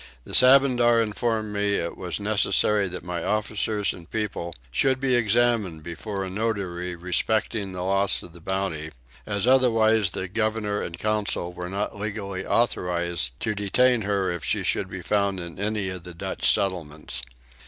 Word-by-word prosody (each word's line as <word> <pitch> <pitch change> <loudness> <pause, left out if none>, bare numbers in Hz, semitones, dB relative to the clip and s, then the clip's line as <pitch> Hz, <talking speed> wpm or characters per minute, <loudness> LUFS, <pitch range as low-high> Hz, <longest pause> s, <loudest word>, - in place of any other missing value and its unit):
The - - -11
Sabandar 125 -3 +6
informed 110 -1 -1
me 100 0 +1
it 85 -2 -2
was 90 0 -4
necessary 105 0 +2
that 90 - -6
my 90 -2 -4
officers 105 -1 0
and 85 -2 -12
people 100 -6 -3 0.2
should 130 - +2
be 135 -1 +1
examined 115 -7 +2
before 95 +4 -4
a 95 - -4
notary 95 -4 -2
respecting 95 +3 0
the 90 -1 -4
loss 100 +1 +1
of 85 - -12
the 85 - -14
Bounty, 95 -4 -2 0.4
as 100 +1 0
otherwise 115 -5 +4
the 95 - -4
governor 110 0 -1
and 85 - -5
council 105 -4 -1
were 90 0 -6
not 100 +1 -3
legally 100 -2 -4
authorised 85 - 0
to 110 - 0
detain 115 +4 +3
her 100 -2 0
if 85 -2 -4
she - - 0
should - - 0
be - - -7
found 100 -2 +1
in 85 0 -7
any 105 -1 -1
of 90 -1 -6
the 90 0 -11
Dutch - - +1
settlements. 80 -10 -2
100 Hz, 165 wpm, -25 LUFS, 90-110 Hz, 0.4 s, Sabandar